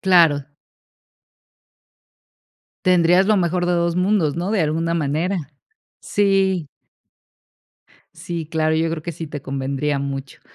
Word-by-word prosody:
Claro. 165 -7 +4 2.4
Tendrías 180 +1 +4
lo 215 0 +4
mejor 175 0 0
de 180 - +1
2 170 0 0
mundos, 180 -5 +1
¿no? 180 +3 -2
De 210 -4 +1
alguna 165 +2 0
manera. 165 +5 0 0.6
Sí. 195 -4 +1 1.5
Sí, 170 -3 -6
claro, 155 0 0
yo 160 +1 +1
creo 165 -1 -4
que 170 +1 -5
sí 160 +2 -7
te 145 -2 -7
convendría 140 +2 -2
mucho. 140 -1 -5
165 Hz, 120 wpm, -21 LUFS, 150-180 Hz, 2.4 s, Claro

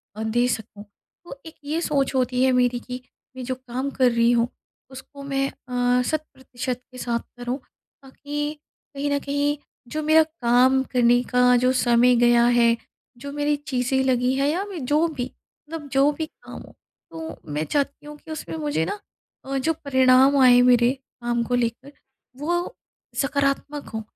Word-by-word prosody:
अ, 215 - -4
दे 240 +3 +1
सकूँ। 220 -3 -4 0.4
तो 280 -5 -10
एक 320 - -11
ये 305 +3 -2
सोच 280 -5 0
होती 255 0 +1
है 260 - +4
मेरी 250 -1 +2
कि 250 +1 -7 0.3
मैं 260 - -6
जो 255 +1 -2
काम 255 +1 -4
कर 255 -2 +3
रही 235 0 +3
हूँ 235 -1 +2 0.4
उसको 275 +2 -11
मैं 275 -1 -1 0.5
अ, - - +3
शत 310 +3 -1
प्रतिशत 250 -1 -5
के 255 - -12
साथ 240 -1 -1 0.2
करूँ 245 +1 -3 0.4
ताकि 290 +2 -5 0.4
कहीं 285 +1 -2
न 285 - +1
कहीं 285 +1 -1 0.3
जो 310 +5 -3
मेरा 315 +1 +5
काम 260 -4 +2
करने 245 -1 +4
का 250 0 +3
जो 255 +1 +3
समय 245 -1 +4
गया 240 0 +4
है। 240 -1 +4 0.4
जो 280 +3 -7
मेरी 295 +1 0
चीज़ें 265 0 0
लगी 255 -1 +2
हैं 275 +1 +1
या 340 +6 0
मैं 375 -8 -7
जो 300 +5 +2
भी 290 -6 -4 0.5
मतलब 320 -2 -6
जो 275 +2 +4
भी 320 - -2
काम - - -12
हो, - - -15 0.4
तो 320 0 -7
मैं 150 +1 -1
चाहती 285 - -2
हूँ 295 0 -9
कि 315 - -13
उसमें 175 - -6
मुझे 155 +1 -1
ना 415 - -4 0.5
अ, 270 0 -2
जो 320 +5 +1
परिणाम 265 -2 +4
आए 245 -1 +7
मेरे 245 -1 +5 0.3
काम 240 0 0
को 245 +2 -1
लेकर 245 +3 -2 0.5
वो 345 - -2 0.5
सकारात्मक 280 +1 -1
हों, 220 - -3
260 Hz, 175 wpm, -23 LUFS, 245-290 Hz, 0.5 s, आए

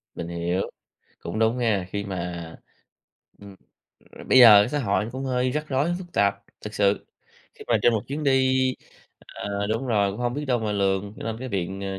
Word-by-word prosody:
Mình 85 - -5
hiểu, 85 +2 -2 0.5
cũng 85 +6 -5
đúng 110 +2 +2
nha 110 -6 0
khi 100 0 -3
mà, 90 -3 -5 0.9
ừm, 100 -1 -12 0.7
bây 130 - +6
giờ 110 -5 +10
cái - - -2
xã 150 - -2
hội 105 -4 0
cũng 135 +1 -5
hơi 125 -1 0
rắc 150 +3 -3
rối, 145 +6 0
phức 175 -2 -11
tạp 100 0 +1 0.2
thực 105 0 -8
sự. 100 0 +1 0.5
Khi - - -12
mà - - +4
trên 120 - +5
một 110 -2 -1
chuyến 145 +2 -4
đi 130 -1 +3 0.6
ờ, 100 0 -5
đúng 115 +5 -2
rồi, 105 -4 +2
cũng 100 - -7
hông 120 0 -1
biết 145 +1 -3
đâu 125 -3 +1
mà 110 -2 -2
lường 100 0 -1
cho - - -8
nên 110 -1 -3
cái 130 +1 -6
biện 95 -1 -3
à, 95 0 -4
105 Hz, 205 wpm, -24 LUFS, 100-130 Hz, 0.9 s, giờ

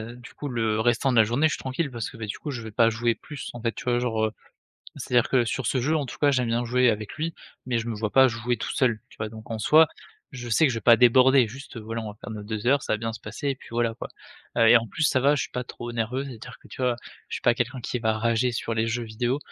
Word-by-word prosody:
du 125 -1 -13
coup 145 - -6
le 110 -3 0
restant 120 +3 +2
de 120 - +1
la 110 - +8
journée 120 +8 +2
je 155 - -2
suis - - -4
tranquille 135 +3 -3
parce 115 -2 -4
que, 120 - -13
bah, 115 - -5
du 105 - -6
coup 150 - -6
je 120 -3 -5
vais 110 - -7
pas 115 +2 +4
jouer 115 +1 0
plus 150 -3 -8
en 120 - -8
fait 115 -1 0
tu - - -8
vois? 120 -1 +2
Genre, 110 -3 0
heu 110 - -2 0.7
c'est-à-dire 120 -2 +1
que 130 -3 +3
sur 120 +1 -3
ce 130 +3 +1
jeu 155 +4 +1
en 145 -3 -1
tout - - -8
cas 145 -1 +4
j'aime 130 -3 +1
bien 120 +1 0
jouer 125 +1 +3
avec 105 -1 -4
lui, 160 +1 -3 0.3
mais 125 -2 0
je 115 - -4
me 115 - -2
vois 105 0 -2
pas 130 0 +6
jouer 120 +1 -2
tout 120 - -4
seul 120 -5 +2
tu - - -19
vois? 110 - -3
Donc 110 +1 -12
en 110 - -3
soi, 155 +8 +6 0.5
je 120 -2 -7
sais 155 +8 +4
que 130 - +1
je 115 - -3
vais - - -11
pas 115 +1 +7
déborder. 130 0 +5
Juste 130 0 -10
voilà 115 +1 -5
on 105 - -5
va 105 - -13
faire 110 - -8
nos 105 -1 -6
2 110 +1 -5
heures 140 +2 +4
ça - - -2
va 110 - -2
bien 115 0 -3
se - - -9
passer 145 - -5
et 135 - -1
puis - - -15
voilà 115 -1 0
quoi, - - -7 0.5
heu, 115 -1 +6
et 120 - +8
en 115 - -5
plus 165 - -5
ça 130 - +3
va 140 +3 +4
je - - 0
suis - - -6
pas 125 0 -3
trop 120 0 -7
nerveux. 120 +4 -2
C'est-à-dire 125 -2 -10
que - - -16
tu 130 - -7
vois? 125 -1 +2 0.3
Je - - -3
suis - - -9
pas 120 - +4
quelqu'un 125 +2 -2
qui 125 - -3
va 110 -1 +1
rager 115 +2 +1
sur 115 0 -3
les 110 +1 0
jeux 120 +1 -2
vidéos, 120 +4 -1
120 Hz, 315 wpm, -25 LUFS, 115-130 Hz, 0.7 s, la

